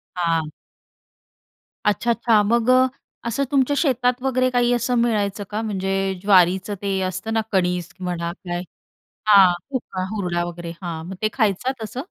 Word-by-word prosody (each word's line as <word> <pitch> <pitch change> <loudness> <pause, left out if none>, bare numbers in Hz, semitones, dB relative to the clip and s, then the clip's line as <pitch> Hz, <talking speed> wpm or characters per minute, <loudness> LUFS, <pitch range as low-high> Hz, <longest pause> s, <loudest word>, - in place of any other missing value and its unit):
हां. 165 -3 0 1.3
अच्छा, 210 +3 +1
अच्छा. 230 -2 +3
मग 230 +3 +1
अ, 255 0 +6 0.4
असं 275 +5 0
तुमच्या 280 0 +2
शेतात 250 -3 +1
वगैरे 255 -1 +2
काही 245 -1 +2
असं 245 +1 0
मिळायचं 210 -3 0
का 215 +1 -2
म्हणजे 195 -3 -2 0.3
ज्वारीचं 190 0 +4
ते 195 -1 -1
असतं 185 +4 -3
ना 225 - +3
कणिज 180 -2 +1
म्हणा 175 -2 -3
काय 175 -1 -5 0.6
हां 195 -4 +7 0.2
कुका, 230 -8 -4
हुरडा 175 -4 -1
वगैरे 175 -1 -6
हां 165 -2 -5
मग 190 - -6
ते 215 - +3
खायचं 225 +2 +1
तसं? 220 +4 -5
205 Hz, 150 wpm, -22 LUFS, 180-240 Hz, 1.3 s, हां